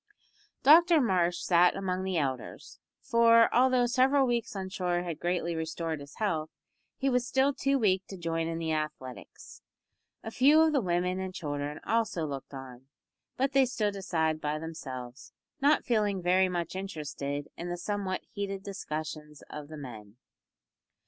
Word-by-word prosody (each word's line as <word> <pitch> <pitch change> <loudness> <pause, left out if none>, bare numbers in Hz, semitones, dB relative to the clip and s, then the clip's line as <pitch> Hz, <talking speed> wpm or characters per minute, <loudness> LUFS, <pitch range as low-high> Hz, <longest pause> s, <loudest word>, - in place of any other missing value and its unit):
Dr 335 +3 +7
Marsh 180 -8 +1
sat 175 0 +4
among 185 -1 -2
the 190 -2 -1
elders, 130 -5 -4 0.2
for, 230 0 +5
although 255 0 +4
several 265 +3 +3
weeks 235 -3 -1
on 190 -1 -4
shore 180 -2 -1
had 170 -3 -5
greatly 175 -1 -1
restored 160 0 -3
his 140 0 -12
health, 160 -8 -1 0.5
he 275 - -1
was 250 -2 +1
still 265 +3 +2
too 275 +1 +1
weak 190 -6 +1
to 195 - -8
join 165 -1 -2
in 165 0 -3
the 165 -1 -2
athletics. 150 -5 -6 0.6
A 225 - -6
few 280 +6 +5
of 320 -1 +3
the 275 - +3
women 180 0 0
and 190 -1 -5
children 145 -2 -4
also 220 -7 0
looked 140 -3 -6
on, 130 -2 -10 0.5
but 270 +2 +1
they 270 -2 +4
stood 210 -5 -1
aside 160 -5 -1
by 150 +1 -1
themselves, 130 -5 -8 0.3
not 290 +2 +3
feeling 210 -4 +1
very 185 +1 +3
much 175 -1 -3
interested 150 -6 -4
in 175 +1 -6
the 175 - -3
somewhat 195 0 -3
heated 195 -2 -4
discussions 155 -6 -6
of 150 -1 -7
the 155 0 -9
men. 110 -7 -10
180 Hz, 160 wpm, -29 LUFS, 155-230 Hz, 0.6 s, Dr